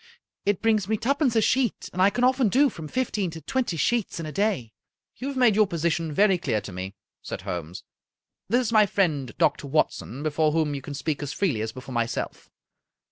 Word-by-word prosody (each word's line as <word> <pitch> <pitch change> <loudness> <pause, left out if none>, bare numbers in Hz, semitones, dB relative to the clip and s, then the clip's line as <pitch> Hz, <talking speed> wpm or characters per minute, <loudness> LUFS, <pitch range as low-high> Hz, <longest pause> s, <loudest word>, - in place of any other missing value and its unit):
It 205 0 +1
brings 215 -4 +2
me 220 +1 +1
twopence 270 +1 +1
a 225 - +4
sheet, 255 0 +1
and 185 - -1
I 195 - +6
can 245 +4 -2
often 255 -2 +4
do 270 +4 +4
from 160 -5 -8
fifteen 210 - -1
to 160 0 -8
twenty 240 - -1
sheets 230 +1 0
in 165 - -4
a 155 - -5
day." 195 - -1 0.4
"You 260 - -5
have 280 -1 -4
made 245 -5 +5
your 215 -1 +4
position 165 -1 -1
very 195 +3 +3
clear 110 - 0
to 105 0 -9
me," 95 +2 -6 0.3
said - - -6
Holmes. 85 0 -5 0.3
" - - -59
This 245 +4 +3
is 230 -2 -2
my 215 -2 +6
friend, 150 - 0
Doctor 145 0 +1
Watson, 140 -2 -1
before 155 0 +1
whom 155 -2 +1
you 140 - -4
can 145 +2 -7
speak 150 +1 -2
as 145 - -4
freely 155 - 0
as 110 0 -2
before 130 +2 -9
myself. 115 -1 -3
175 Hz, 215 wpm, -25 LUFS, 145-220 Hz, 0.4 s, I